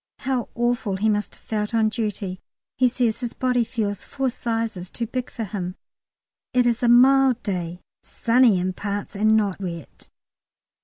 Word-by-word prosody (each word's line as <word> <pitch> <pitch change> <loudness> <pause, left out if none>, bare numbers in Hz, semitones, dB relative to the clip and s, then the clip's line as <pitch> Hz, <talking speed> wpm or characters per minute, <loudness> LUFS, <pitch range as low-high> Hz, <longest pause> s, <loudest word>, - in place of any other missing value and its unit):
How 260 -3 -1
awful 240 -4 0
he 215 +3 +2
must 210 0 -1
have - - -25
felt 210 +1 -2
on 220 -1 +3
duty. 205 -5 -3 0.4
He 255 - +4
says 240 -2 0
his 240 -2 -5
body 250 -2 +2
feels 215 -4 -3
"four 270 -2 -2
sizes 225 -6 -3
too 235 - -4
big 250 +2 -4
for 230 - -5
him." 185 -3 -4 0.8
It 250 -1 +4
is 235 -1 +1
a 245 - +2
mild 255 +1 +5
day, 180 -3 -3 0.2
sunny 230 -4 +3
in 185 +1 -1
parts, 200 +1 -4
and 215 +2 +4
not 200 -3 0
wet. 170 -5 -7
225 Hz, 165 wpm, -23 LUFS, 200-245 Hz, 0.8 s, mild